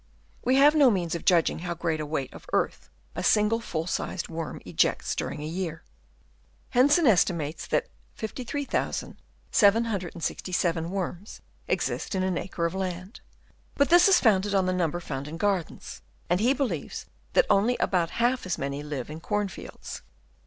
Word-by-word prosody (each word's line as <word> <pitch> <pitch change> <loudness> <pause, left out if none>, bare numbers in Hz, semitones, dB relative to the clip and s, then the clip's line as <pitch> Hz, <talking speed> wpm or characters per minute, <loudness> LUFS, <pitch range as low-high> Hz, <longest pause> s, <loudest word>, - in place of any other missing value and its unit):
We 255 +2 +3
have 285 +2 +7
no 290 -4 +6
means 180 -6 0
of 170 - -4
judging 170 -4 +3
how 175 0 -4
great 165 -2 -1
a 155 - -3
weight 140 -4 -3
of - - -13
earth - - -1 0.2
a 180 - -4
single 210 +4 +3
full 165 -8 -3
sized 180 0 -3
worm 165 -1 -5
ejects - - +1
during 150 - -4
a - - -4
year. 165 -1 -4 0.9
Hensen 290 +7 +4
estimates 170 - +2
that - - +1 0.3
53,767 200 - -1
worms 190 +1 -5 0.3
exist - - -1
in 185 - 0
an 185 -2 0
acre 170 -2 -3
of 170 - -1
land; 185 +2 -5 0.5
but 280 - +3
this 350 +2 +7
is 390 - +6
founded 205 -3 +3
on 190 -1 +3
the 185 - +1
number 175 -2 0
found 140 -4 -5
in 160 +2 -6
gardens, 195 -2 -2 0.3
and 180 - +3
he 235 +5 +3
believes 275 -3 -3 0.3
that - - +5
only 225 +5 +3
about 175 -3 +1
half 240 0 0
as 185 - -1
many 140 +1 -3
live 145 -4 -5
in 155 +1 -7
corn 205 +3 -1
fields. - - -9
185 Hz, 160 wpm, -27 LUFS, 165-225 Hz, 0.9 s, have